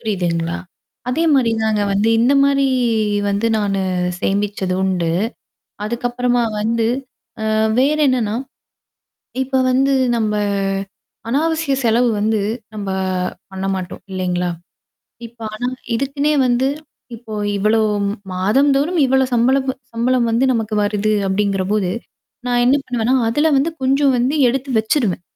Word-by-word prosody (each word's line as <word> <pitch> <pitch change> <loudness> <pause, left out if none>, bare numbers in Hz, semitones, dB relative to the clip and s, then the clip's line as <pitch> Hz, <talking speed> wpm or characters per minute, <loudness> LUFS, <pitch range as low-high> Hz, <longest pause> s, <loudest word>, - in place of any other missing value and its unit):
புரியுதுங்களா? 175 -5 -1 0.5
அதேமாரிதாங்க 235 -8 +2
வந்து 205 +3 +2
இந்தமாரி 275 +3 +3 0.6
வந்து 200 +3 0
நானு 200 -2 0 0.4
சேமிச்சது 200 -2 -1
உண்டு. 180 -3 0 0.7
அதுக்கப்புறமா 245 +2 0 0.2
வந்து 225 +1 0 0.7
அ - - +1 0.3
வேற 290 +4 +3
என்னன்னா, 235 -5 0 1.1
இப்ப 265 0 0
வந்து 270 +2 +2 0.2
நம்ப 215 -2 0 1.0
அநாவசிய 315 +2 0
செலவு 235 +1 +3
வந்து 215 +1 +1 0.4
நம்ப 200 -2 -4 0.6
பண்ண 190 0 -5
மாட்டோம். 185 -1 -6
இல்லேங்களா? 180 -1 -1 0.8
இப்ப 230 0 -20
ஆனா 245 +3 -2 0.3
இதுக்குன்னே 280 +4 0
வந்து 245 +1 +2 0.5
இப்போ 225 -1 -9 0.2
இவ்ளோ 215 +3 +2 0.5
மாதம்ந்தோறும் 275 - +2
இவ்ளோ 265 0 +3
சம்பள 245 +3 +3 0.3
சம்பளம் 240 +1 +1
வந்து 230 +3 +2
நமக்கு 225 -2 -2
வருது 210 +1 0
அப்பிடிங்கிறபோது. 195 0 0 0.6
நான் 245 -1 +2
என்ன 255 +3 +4
பண்ணுவேன்னா, 245 0 0
அதல 295 +7 +2
வந்து 280 +5 +2
கொஞ்சம் 275 +1 +3
வந்து 255 +4 +1
எடுத்து 270 +2 -2
வச்சுருவேன். 220 - 0
230 Hz, 110 wpm, -19 LUFS, 205-265 Hz, 1.1 s, என்ன